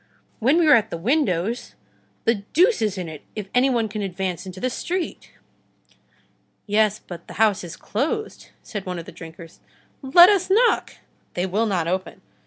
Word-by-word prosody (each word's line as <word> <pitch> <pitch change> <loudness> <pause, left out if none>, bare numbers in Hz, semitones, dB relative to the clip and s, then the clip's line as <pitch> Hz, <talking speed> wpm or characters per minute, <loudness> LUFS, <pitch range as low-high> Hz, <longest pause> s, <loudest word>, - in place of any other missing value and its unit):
When 265 +8 +3
we 345 - +4
are 300 - +7
at 225 -3 +4
the - - -4
windows, 225 - -1 0.5
the 230 -3 +2
deuce 375 - +4
is 210 -3 0
in 180 -2 -4
it 155 -2 -9
if 210 -2 -5
any 250 +2 +4
one 235 -3 +1
can 210 0 -5
advance 190 -2 -3
into 185 0 -8
the 255 - 0
street!" 350 +7 -4 1.3
"Yes, 215 0 +2
but 170 -4 -11
the - - -10
house 215 -4 +2
is 175 - -7
closed," 320 - -3
said 200 -4 -6
one 180 -1 -3
of 170 - -7
the - - -10
drinkers. 165 0 -12 0.4
"Let 345 +7 +8
us 390 -3 +2
knock!" 460 +5 +2 0.4
"They 180 - 0
will 210 +5 0
not 180 -5 0
open." 185 +2 -3
215 Hz, 180 wpm, -23 LUFS, 185-270 Hz, 1.3 s, Let